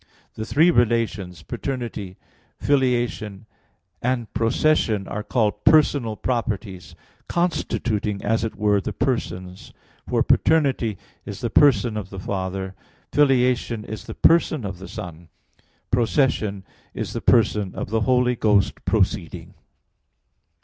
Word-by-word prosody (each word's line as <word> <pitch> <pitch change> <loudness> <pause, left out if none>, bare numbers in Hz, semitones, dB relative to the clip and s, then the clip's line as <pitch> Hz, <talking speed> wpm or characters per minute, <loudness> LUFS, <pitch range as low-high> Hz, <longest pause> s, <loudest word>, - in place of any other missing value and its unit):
The 110 0 -6
three 160 +8 +4
relations 110 - 0
paternity, 115 - -5 0.4
filiation, 120 -7 0 0.6
and 120 -3 -2
procession 115 -2 +1
are 105 - -4
called 105 -2 -1
personal 140 -7 +4
properties, 105 -8 -3 0.3
constituting 110 - -1
as 110 +1 +1
it 115 - -3
were 105 -1 +2
the - - -4
persons; 90 -7 -3 0.4
for - - +2
paternity 135 - +2 0.3
is - - -8
the - - -2
person 120 -6 +4
of 100 -3 -5
the 95 - -9
Father, 95 0 -4 0.4
filiation 125 -5 +2
is 110 - -7
the - - -8
person 160 -6 +3
of 95 -2 -6
the 95 - -9
Son, 85 -1 -9 0.6
procession 115 -4 +1 0.3
is - - -4
the - - -4
person 105 -4 +2
of - - -5
the 110 0 +1
Holy 125 +1 +2
Ghost 105 -3 +1
proceeding. - - -1
110 Hz, 120 wpm, -23 LUFS, 100-125 Hz, 0.6 s, three